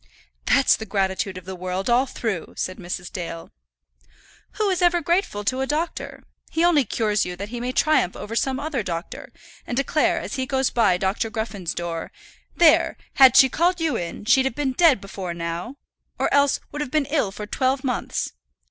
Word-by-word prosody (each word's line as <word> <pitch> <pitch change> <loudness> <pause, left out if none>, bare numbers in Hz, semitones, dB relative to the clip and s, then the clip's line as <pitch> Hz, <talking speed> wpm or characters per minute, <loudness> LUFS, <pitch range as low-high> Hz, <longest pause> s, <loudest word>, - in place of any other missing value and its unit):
"That's - - +5
the 220 - -8
gratitude 190 -1 -1
of 185 - -10
the 190 0 -6
world, 185 +1 -3
all 250 +3 +3
through," 215 -9 -4
said 185 - -3
Mrs. 180 0 -6
Dale. 165 -3 -6 1.0
"Who 430 - 0
is 370 - -1
ever 350 0 +4
grateful 340 - 0
to 255 +5 0
a 265 - -1
doctor? 310 +4 -3 0.3
He 325 - 0
only 305 -6 +4
cures 210 -1 0
you 180 - -4
that 200 +3 -6
he 240 +1 -5
may 245 +1 -2
triumph 280 - +2
over 225 - -6
some 265 +2 0
other 290 -4 -2
doctor, 170 -3 -6 0.4
and 245 - -3
declare, 285 +3 +2
as - - -5
he 260 0 -2
goes 265 -1 +1
by 210 -7 +3
Dr. 190 +4 -1
Gruffen's 215 -6 -4
door, 170 -1 -4 0.4
'There, 330 -3 +4 0.2
had 260 -2 +8
she 265 - +9
called 345 +6 +1
you 325 -2 0
in, 175 +4 -5
she'd 260 +3 +4
have 265 - -1
been 275 -3 -1
dead 295 - +4
before 190 -3 -6
now; 170 +8 -4 0.4
or - - 0
else 285 -1 +3
would 295 - -4
have 295 - -3
been 305 +1 +1
ill 280 -8 0
for 210 +1 -7
twelve 260 +5 0
months.' 250 -3 -2
240 Hz, 190 wpm, -23 LUFS, 190-280 Hz, 1.0 s, she